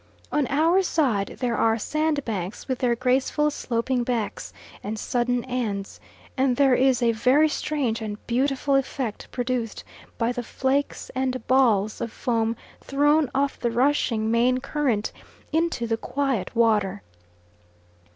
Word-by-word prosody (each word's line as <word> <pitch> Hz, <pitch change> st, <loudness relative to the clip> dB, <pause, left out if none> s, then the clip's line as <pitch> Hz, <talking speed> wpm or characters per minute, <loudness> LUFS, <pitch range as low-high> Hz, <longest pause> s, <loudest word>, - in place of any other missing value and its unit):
On 295 Hz, -3 st, +1 dB
our 325 Hz, +7 st, +3 dB
side 255 Hz, -, 0 dB
there 240 Hz, -2 st, 0 dB
are 225 Hz, +1 st, +2 dB
sandbanks 250 Hz, -, -2 dB
with 260 Hz, -2 st, -2 dB
their 240 Hz, -2 st, +2 dB
graceful 260 Hz, +4 st, +1 dB
sloping 245 Hz, -1 st, -1 dB
backs 235 Hz, -4 st, -3 dB, 0.3 s
and 215 Hz, +2 st, -4 dB
sudden 245 Hz, +2 st, 0 dB
ends, 220 Hz, -6 st, -3 dB, 0.4 s
and 260 Hz, -2 st, +1 dB
there 275 Hz, -2 st, +5 dB
is 255 Hz, -1 st, +3 dB
a 230 Hz, -, +4 dB
very 255 Hz, +7 st, +4 dB
strange 285 Hz, -7 st, -1 dB
and 210 Hz, -1 st, -4 dB
beautiful 270 Hz, +3 st, 0 dB
effect 265 Hz, -4 st, -2 dB
produced 245 Hz, -3 st, -2 dB, 0.3 s
by 230 Hz, 0 st, +1 dB
the 245 Hz, 0 st, -3 dB
flakes 265 Hz, +4 st, -1 dB
and 255 Hz, -2 st, -2 dB
balls 220 Hz, -6 st, +2 dB
of 230 Hz, -, -3 dB
foam 230 Hz, -1 st, 0 dB, 0.3 s
thrown 290 Hz, +1 st, +2 dB
off 280 Hz, +1 st, 0 dB
the 240 Hz, -, 0 dB
rushing 235 Hz, -3 st, +1 dB
main 245 Hz, +2 st, +3 dB
current 255 Hz, -6 st, -1 dB, 0.4 s
into 320 Hz, -6 st, 0 dB
the 225 Hz, -1 st, 0 dB
quiet 260 Hz, -6 st, -2 dB
water. 210 Hz, -4 st, +2 dB
250 Hz, 135 wpm, -24 LUFS, 230-275 Hz, 0.4 s, there